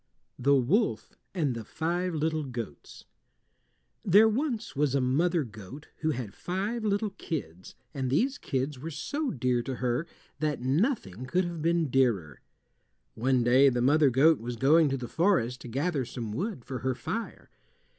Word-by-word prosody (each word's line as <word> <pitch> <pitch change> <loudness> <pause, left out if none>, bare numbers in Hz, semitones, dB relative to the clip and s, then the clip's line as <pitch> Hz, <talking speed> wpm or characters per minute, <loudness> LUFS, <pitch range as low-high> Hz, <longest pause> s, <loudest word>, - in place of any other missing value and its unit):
THE 140 +3 +4
WOLF 165 - +1 0.2
AND 150 -8 +1
THE 115 -1 -6
FIVE 175 +6 -2
LITTLE 155 0 -1
GOATS 125 -4 -8 1.0
There 210 +2 +6
was 235 - -2
once 140 -1 +1
a - - +3
mother 155 +6 +2
goat 110 +5 -11
who 160 - -1
had 120 -9 -3
five 205 +6 -3
little 205 0 0
kids, 95 - -6 0.2
and 130 -2 -2
these 260 - +1
kids 135 0 -2
were 160 +5 -5
so 285 - -3
dear 125 - 0
to 130 +2 -4
her 125 +6 -1 0.3
that 150 -2 -1
nothing 130 - -1
could 180 +7 +1
have 170 -2 -5
been 165 -1 +1
dearer. 105 - +1 0.7
One 125 +1 +1
day 130 +4 +6
the 125 -2 -1
mother 145 +2 +5
goat 145 +5 +4
was 120 +2 -5
going 150 +6 +4
to 135 - -1
the 125 -2 -6
forest 125 - +1
to - - -8
gather 140 +4 -1
some 115 -3 -6
wood 175 - -4
for 130 -2 -5
her 130 +2 -1
fire. 230 - -5
140 Hz, 165 wpm, -28 LUFS, 125-175 Hz, 1.0 s, There